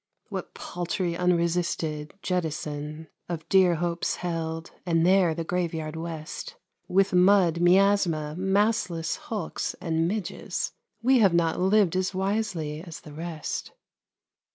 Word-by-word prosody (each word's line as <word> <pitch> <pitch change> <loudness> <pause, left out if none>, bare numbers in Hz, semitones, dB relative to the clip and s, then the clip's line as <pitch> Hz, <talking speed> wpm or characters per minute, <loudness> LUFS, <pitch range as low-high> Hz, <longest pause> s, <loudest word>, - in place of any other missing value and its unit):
What - - -6
paltry, 175 0 -2
unresisted 170 -3 0
jettison 155 -3 -3 0.2
Of 165 -2 -4
dear 185 -3 +5
hopes 170 +1 -1
held, 165 -1 -4
and 165 -2 +2
there 180 -3 +4
the 165 - -2
graveyard 165 -3 -2
West, 165 - -6 0.3
With 195 +1 +2
mud, 180 -2 +5
miasma, 175 -4 +3
mastless 190 -3 +1
hulks, 210 -7 -3
and 165 0 0
midges! 200 0 -3 0.3
We 260 +1 +5
have 195 -6 +5
not 165 -1 +2
lived 190 -1 +3
as 185 +1 0
wisely 190 -6 -1
as 170 -3 -9
the 150 - -12
rest. 160 0 -5
170 Hz, 120 wpm, -27 LUFS, 160-190 Hz, 0.3 s, dear